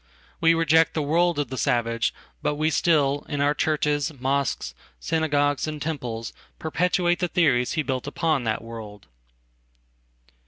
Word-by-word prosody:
We 165 0 +4
reject 160 0 +3
the 155 - 0
world 170 +3 +2
of 145 -4 -1
the 130 - -4
savage; 115 -3 +1 0.3
but 150 - 0
we 155 +2 +1
still, 145 -4 +2
in 145 -2 -2
ourchurches, 145 0 +1
mosques, 135 +1 -1 0.3
synagogues 145 - +1
and 155 -1 -4
temples, 125 -8 -4 0.2
perpetuate 175 +2 +1
the 180 - 0
theorieshe 145 -2 +2
built 130 -1 -2
upon 155 -2 0
that 110 0 -1
world. 110 -3 -9
145 Hz, 130 wpm, -24 LUFS, 130-160 Hz, 0.3 s, We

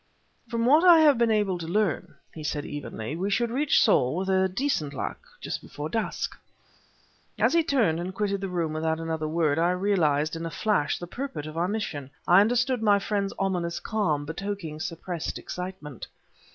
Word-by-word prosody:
"From 230 -1 0
what 300 +7 +6
I 350 -2 +9
have 290 -6 +5
been 235 -1 +3
able 205 -4 +1
to 165 - -6
learn," 200 0 0 0.2
he 155 - -8
said, 150 -1 -2
evenly, 145 -3 -5
"we 190 +4 -2
should 235 +3 +1
reach 280 +4 +3
Saul, 140 - +3
with 190 0 +1
decent 180 - -1
luck, - - -4 0.2
just - - -4
before 150 +1 -6
dusk." 225 +3 -2 1.0
As - - +3
he 335 - +5
turned, 230 - +2
and 180 +2 -3
quitted 200 0 -1
the 195 - -3
room 170 -3 -1
without 160 0 -1
another 160 -1 -2
word, 155 -1 +1
I 170 +1 +3
realized, 170 -6 +1
in 165 - -5
a 165 - -3
flash, 185 -5 0
the 175 - -6
purport 175 - -5
of 155 0 -8
our 170 +2 +1
mission; 175 -10 -3 0.2
I 180 +3 +7
understood 245 +3 +1
my 205 -2 +5
friend's 200 0 -1
ominous 180 -3 -1
calm, 160 -10 -1
betokening 165 -1 -5
suppressed 165 +1 -4
excitement. 180 - -7
180 Hz, 180 wpm, -26 LUFS, 160-215 Hz, 1.0 s, I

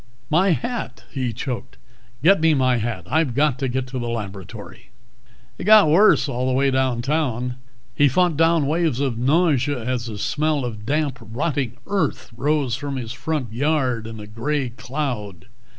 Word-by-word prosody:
"My 180 +5 +4
hat," 240 +8 -4
he 130 -3 -2
choked. 125 +2 -5 0.5
"Get 190 +1 +5
me 160 -1 +4
my 130 -2 +2
hat. 110 -5 -3
I've 150 -3 +1
got 145 -2 +2
to 135 - 0
get 130 +1 -2
to 130 0 -4
the 120 -1 -3
laboratory." 100 -5 -7 0.7
It - - -5
got 210 -5 +7
worse 195 0 +5
all 130 -1 -2
the 130 - +1
way 135 +1 +2
downtown. 130 -1 0 0.4
He 145 +4 +4
fought 175 +4 +2
down 165 -1 +3
waves 155 -3 0
of 130 -5 -1
nausea 145 -1 +2
as 125 0 -2
the 110 -2 -6
smell 150 +3 0
of 110 -3 -7
damp, 145 -3 0
rotting 125 +2 -2
earth 200 -8 -2
rose 140 0 0
from 140 +2 -3
his 120 -4 -5
front 130 -2 -3
yard 130 -4 0
in 110 -1 -8
a 105 - -8
gray 130 +6 -2
cloud. 120 - -4
130 Hz, 165 wpm, -22 LUFS, 120-150 Hz, 0.7 s, got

